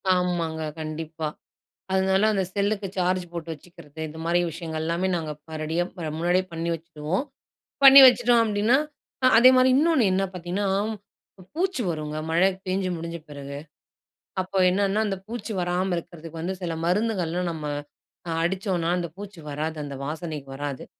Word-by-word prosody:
ஆமாங்க. 170 Hz, -3 st, -1 dB, 0.2 s
கண்டிப்பா. 155 Hz, 0 st, -4 dB, 0.7 s
அதனால, 190 Hz, +1 st, +3 dB
அந்த 195 Hz, -2 st, +1 dB
செல்லுக்கு 200 Hz, 0 st, 0 dB
சார்ஜ் 180 Hz, 0 st, +1 dB
போட்டு 170 Hz, -1 st, -6 dB
வச்சுக்கிறது. 160 Hz, -1 st, -12 dB
இதுமாரி 165 Hz, +3 st, 0 dB
விஷயங்கள் 160 Hz, -1 st, -5 dB
எல்லாமே, 170 Hz, +3 st, 0 dB
நாங்க 155 Hz, -2 st, -3 dB, 0.2 s
ப 160 Hz, -, -6 dB
ரெடியா 165 Hz, +3 st, 0 dB
இப்ப 165 Hz, -5 st, -6 dB
முன்னாடியே 175 Hz, +2 st, +2 dB
பண்ணி 165 Hz, +1 st, -2 dB
வச்சிருவோம். 165 Hz, -, -3 dB, 0.6 s
பண்ணி 275 Hz, 0 st, +12 dB
வச்சுட்டோம் 245 Hz, -1 st, +5 dB
அப்பிடின்னா, 215 Hz, +4 st, +3 dB, 0.5 s
அ -, -, +7 dB
அதேமாரி 255 Hz, +1 st, +7 dB
இன்னோன்னு 310 Hz, -5 st, +4 dB
என்ன 195 Hz, +1 st, +2 dB
பார்த்தீங்கன்னா, 180 Hz, +3 st, -2 dB, 0.9 s
பூச்சி 360 Hz, -7 st, 0 dB
வருங்க. 155 Hz, -1 st, -4 dB
மழை 175 Hz, +4 st, +4 dB, 0.2 s
பேஞ்சு 185 Hz, 0 st, 0 dB
முடிஞ்ச 170 Hz, +1 st, -5 dB
பிறகு. 140 Hz, 0 st, -7 dB, 0.8 s
அப்போ 185 Hz, +1 st, -4 dB
என்னன்னா, 200 Hz, +3 st, +1 dB
அந்த 195 Hz, -1 st, -2 dB
பூச்சி 230 Hz, -1 st, -5 dB
வராம 180 Hz, +1 st, 0 dB
இருக்கிறதுக்கு 165 Hz, -1 st, -8 dB
வந்து, 190 Hz, +3 st, -2 dB
சில 170 Hz, -1 st, -2 dB
மருந்துகள்லாம் 180 Hz, -3 st, 0 dB
நம்ம 155 Hz, -2 st, -6 dB, 0.6 s
அ -, -, -1 dB
அடிச்சோன்னா, 180 Hz, -2 st, 0 dB
அந்த 170 Hz, -2 st, -3 dB
பூச்சி 200 Hz, -4 st, -9 dB
வராது. 155 Hz, +2 st, -3 dB
அந்த 140 Hz, -1 st, -6 dB
வாசனைக்கு 155 Hz, -3 st, -5 dB
வராது. 140 Hz, -1 st, -5 dB
175 Hz, 145 wpm, -25 LUFS, 160-195 Hz, 0.9 s, பண்ணி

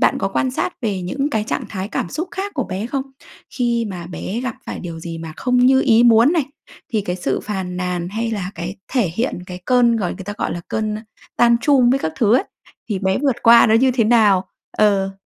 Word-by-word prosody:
bạn -, -, +3 dB
có -, -, -1 dB
quan 260 Hz, -, 0 dB
sát 265 Hz, -, -2 dB
về 200 Hz, -5 st, -1 dB
những 275 Hz, +11 st, -2 dB
cái 220 Hz, -4 st, 0 dB
trạng -, -, -3 dB
thái 195 Hz, -1 st, -5 dB
cảm 175 Hz, -, -3 dB
xúc 325 Hz, -, -4 dB
khác 395 Hz, +1 st, -4 dB
của 265 Hz, -5 st, -1 dB
bé 195 Hz, +3 st, -4 dB
không? 270 Hz, +2 st, -2 dB, 0.5 s
Khi 235 Hz, -2 st, 0 dB
mà 175 Hz, -3 st, -7 dB
bé 185 Hz, +5 st, -5 dB
gặp 255 Hz, -2 st, -3 dB
phải -, -, -5 dB
điều 165 Hz, -2 st, -7 dB
gì 165 Hz, 0 st, -6 dB
mà 165 Hz, -1 st, -7 dB
không 250 Hz, -1 st, +1 dB
như 260 Hz, +2 st, +5 dB
ý 235 Hz, -4 st, +4 dB
muốn 235 Hz, +4 st, +6 dB
này, 330 Hz, -5 st, +1 dB, 0.5 s
thì 220 Hz, -, +2 dB
cái 180 Hz, -3 st, -3 dB
sự 180 Hz, -, -2 dB
phàn 190 Hz, -3 st, -4 dB
nàn, 180 Hz, -1 st, -2 dB
hay 225 Hz, +4 st, -3 dB
là 195 Hz, -4 st, -3 dB
cái 175 Hz, +4 st, -6 dB, 0.2 s
thể 245 Hz, -8 st, +2 dB
hiện 235 Hz, +1 st, -1 dB
cái 180 Hz, 0 st, -7 dB
cơn 240 Hz, 0 st, +3 dB
gọi 195 Hz, -5 st, -1 dB
người 195 Hz, -, -9 dB
ta 205 Hz, -, -5 dB
gọi -, -, -1 dB
là 175 Hz, -, -5 dB
cơn, 215 Hz, -1 st, -2 dB
ơ, 215 Hz, -, -5 dB, 0.4 s
tantrum 240 Hz, +2 st, +4 dB
với 265 Hz, -, +3 dB
các 160 Hz, -10 st, -3 dB
thứ 220 Hz, -1 st, +4 dB
ấy, 260 Hz, -, +3 dB, 0.4 s
thì 205 Hz, -4 st, -1 dB
bé 190 Hz, 0 st, 0 dB
vượt 270 Hz, -3 st, +1 dB
qua 235 Hz, 0 st, +7 dB
nó 220 Hz, -, +3 dB
như 260 Hz, +3 st, +4 dB
thế 245 Hz, -2 st, +1 dB
nào? 210 Hz, -5 st, +4 dB, 0.3 s
Ờ. 195 Hz, -2 st, +2 dB
220 Hz, 240 wpm, -20 LUFS, 190-250 Hz, 0.5 s, qua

